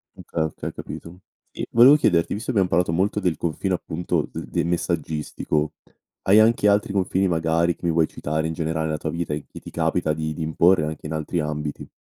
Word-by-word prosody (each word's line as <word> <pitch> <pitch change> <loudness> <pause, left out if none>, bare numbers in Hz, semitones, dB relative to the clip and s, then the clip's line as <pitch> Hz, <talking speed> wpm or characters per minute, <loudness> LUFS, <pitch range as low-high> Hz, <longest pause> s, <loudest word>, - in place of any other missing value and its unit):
Okay, 85 - -4
okay 80 - -4
ho - - -9
capito 85 +2 -9 0.4
e - - -4
volevo 125 +5 +8
chiederti 90 - +2
visto 110 +5 -3
che 120 - -1
abbiam 95 - +3
parlato 90 -1 +1
molto 95 +5 +1
del 90 -5 0
confine, 85 +3 -2
appunto, 85 -2 -2
de - - -5
del - - -1
messaggistico 80 -3 -1 0.5
hai 100 +3 +6
anche 110 -1 +4
altri 100 0 +2
confini 95 0 +1
magari 85 0 +1
che - - -9
mi 85 - +2
vuoi 80 -1 +3
citare, 80 +2 -2
in 80 - -3
generale 80 0 -2
nella 80 -1 -1
tua 80 - -4
vita, 85 -2 -3
e 75 -1 -4
che - - -9
ti - - -10
capita 80 - 0
di 80 0 -3
di 80 - -7
imporre 80 +1 +3
anche 75 0 -6
in 80 - -4
altri 80 +2 -2
ambiti? 75 -1 -4
85 Hz, 215 wpm, -23 LUFS, 80-95 Hz, 0.5 s, volevo